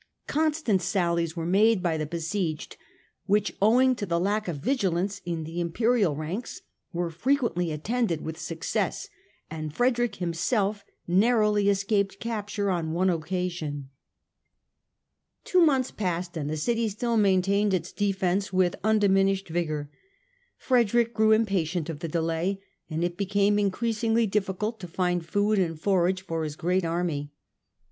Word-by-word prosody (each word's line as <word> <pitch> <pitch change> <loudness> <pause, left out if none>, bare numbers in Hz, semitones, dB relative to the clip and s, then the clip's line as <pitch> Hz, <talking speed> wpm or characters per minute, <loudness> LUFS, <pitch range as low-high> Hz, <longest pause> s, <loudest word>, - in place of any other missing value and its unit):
Constant 305 - +1
sallies 170 -3 0
were 165 -2 -3
made 200 +3 +3
by 170 -3 +1
the 155 -1 -2
besieged 165 0 -3 0.5
which, 205 +1 +1
owing 250 +5 +5
to 235 - -6
the 170 -3 0
lack 205 +3 0
of 170 -4 -3
vigilance 195 - -1
in 170 -2 -3
the 165 +3 -4
Imperial 200 0 +1
ranks, 165 - -5 0.3
were 170 -1 -2
frequently 225 - 0
attended 175 +2 -1
with 160 - -5
success, 165 -1 -2 0.4
and 155 -1 -5
Frederick 240 -3 +1
himself 195 +4 -1 0.2
narrowly 210 +1 +3
escaped 200 0 0
capture 205 -3 -2
on 165 -3 -1
one 185 +2 +2
occasion. 165 -5 -3 1.5
Two 365 - +3
months 265 -5 +2
passed 180 -3 -3
and 150 -3 -3
the 155 - -2
city 230 +7 0
still 230 +3 -1
maintained 200 0 +3
its 180 -2 -1
defence 195 -1 0
with 185 -2 +2
undiminished 195 -3 +2
vigour. 155 -3 -2 0.7
Frederick 235 -2 +2
grew 220 -1 +3
impatient 185 -7 +1
of 150 - -8
the 165 - -4
delay, 165 +4 -1 0.3
and 160 +1 -2
it 175 0 -2
became 200 +1 +2
increasingly 225 +3 +1
diffi 195 -2 -1
cult 220 +3 -3
to 180 - -7
find 180 0 -1
food 205 +3 +2
and 165 -4 -1
forage 185 0 +1
for 165 -3 -3
his 150 -1 -4
great 180 +4 0
army. 165 -4 -2
190 Hz, 140 wpm, -27 LUFS, 170-215 Hz, 1.5 s, owing